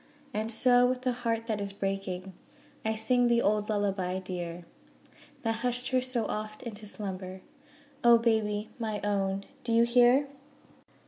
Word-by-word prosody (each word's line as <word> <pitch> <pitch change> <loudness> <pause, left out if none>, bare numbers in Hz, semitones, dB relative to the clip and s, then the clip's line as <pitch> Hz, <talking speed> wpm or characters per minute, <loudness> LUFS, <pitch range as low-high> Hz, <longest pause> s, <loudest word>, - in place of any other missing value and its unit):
And 220 +2 -2
so 245 +2 +5
with 255 0 -2
a 255 - +3
heart 230 -2 -2
that 215 -3 -2
is 200 0 -4
breaking 195 -1 -3 0.5
I 220 0 0
sing 245 +3 +2
the 235 0 +3
old 210 +1 +1
'Lullaby 195 -3 0
dear' 175 -2 -5 0.8
That 225 -1 0
hushed 245 +2 -1
her 255 -1 +2
so 250 -3 -1
oft 215 0 -4
into 215 -3 -6
slumber 190 -2 -6 0.6
O 235 -1 +8
baby 220 -2 0
my 215 -2 -2
own 195 -1 0 0.2
do 235 - -2
you 230 0 +5
hear? 245 +3 +5
220 Hz, 150 wpm, -29 LUFS, 195-240 Hz, 0.8 s, O